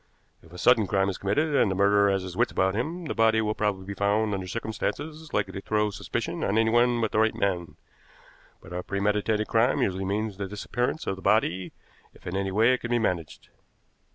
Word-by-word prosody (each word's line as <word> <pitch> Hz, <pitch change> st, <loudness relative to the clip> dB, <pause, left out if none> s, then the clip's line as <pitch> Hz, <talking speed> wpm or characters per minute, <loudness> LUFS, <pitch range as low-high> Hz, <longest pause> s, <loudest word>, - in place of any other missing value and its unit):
If 80 Hz, -, -19 dB
a 90 Hz, -, -10 dB
sudden 110 Hz, +2 st, +4 dB
crime 95 Hz, +1 st, +1 dB
is 95 Hz, -, -5 dB
committed, 145 Hz, +11 st, 0 dB
and 125 Hz, -7 st, +3 dB
the 95 Hz, -, -1 dB
murderer 100 Hz, +1 st, +4 dB
has 95 Hz, -1 st, 0 dB
his 90 Hz, -1 st, -7 dB
wits -, -, +1 dB
about 95 Hz, +1 st, +1 dB
him, 160 Hz, -, -3 dB
the -, -, -3 dB
body 110 Hz, 0 st, +3 dB
will 105 Hz, -1 st, 0 dB
probably 105 Hz, -3 st, -2 dB
be 100 Hz, -, -5 dB
found 105 Hz, +2 st, +1 dB
under 95 Hz, -2 st, -3 dB
circumstances 145 Hz, -, -4 dB
likely 100 Hz, -2 st, -1 dB
to 95 Hz, -, -5 dB
throw 105 Hz, 0 st, 0 dB
suspicion -, -, -4 dB
on 100 Hz, +2 st, +1 dB
anyone 120 Hz, +2 st, +3 dB
but 110 Hz, -, 0 dB
the -, -, +1 dB
right 110 Hz, 0 st, +2 dB
man; 90 Hz, -4 st, -2 dB, 0.9 s
but 85 Hz, -, -11 dB
a 90 Hz, -, -3 dB
premeditated 105 Hz, +2 st, 0 dB
crime 115 Hz, +3 st, +2 dB
usually 95 Hz, 0 st, -1 dB
means 105 Hz, +1 st, -2 dB
the 100 Hz, -1 st, -4 dB
disappearance 120 Hz, -, -3 dB
of 95 Hz, -, -2 dB
the -, -, -10 dB
body 95 Hz, -3 st, +1 dB, 0.4 s
if -, -, -20 dB
in 90 Hz, -, -4 dB
any 95 Hz, 0 st, -1 dB
way 115 Hz, +6 st, +4 dB
it 125 Hz, -, 0 dB
can 120 Hz, -, -5 dB
be 120 Hz, -, +2 dB
managed. 90 Hz, -8 st, -3 dB
105 Hz, 215 wpm, -26 LUFS, 95-110 Hz, 0.9 s, sudden